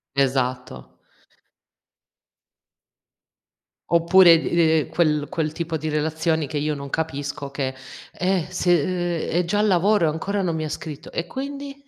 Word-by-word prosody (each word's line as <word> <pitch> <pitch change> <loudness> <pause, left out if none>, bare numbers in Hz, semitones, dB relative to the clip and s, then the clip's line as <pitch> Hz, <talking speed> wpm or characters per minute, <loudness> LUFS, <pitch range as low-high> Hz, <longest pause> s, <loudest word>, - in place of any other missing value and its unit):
Esatto. 130 -2 -1 2.9
Oppure 170 0 +6
d - - -6
ehm, 160 -3 +2
quel 150 -3 +1
quel 155 -2 -2
tipo 165 0 -4
di 155 0 -3
relazioni 160 +1 0
che 155 - -4
io 150 +1 -1
non 140 -1 -7
capisco 145 -2 -4
che: 135 -1 -3 0.4
"Eh, 180 -2 0
se 175 -3 +2 0.5
ehm, - - -4
è 175 +2 +1
già 200 +4 -1
al 215 - +3
lavoro 195 0 +3
e - - +3
ancora 195 +6 -2
non 170 -3 -1
mi 160 - -2
ha 155 - -3
scritto"; 150 -1 -7
e 165 - -3
quindi? 280 +2 -7
160 Hz, 145 wpm, -23 LUFS, 150-180 Hz, 2.9 s, Oppure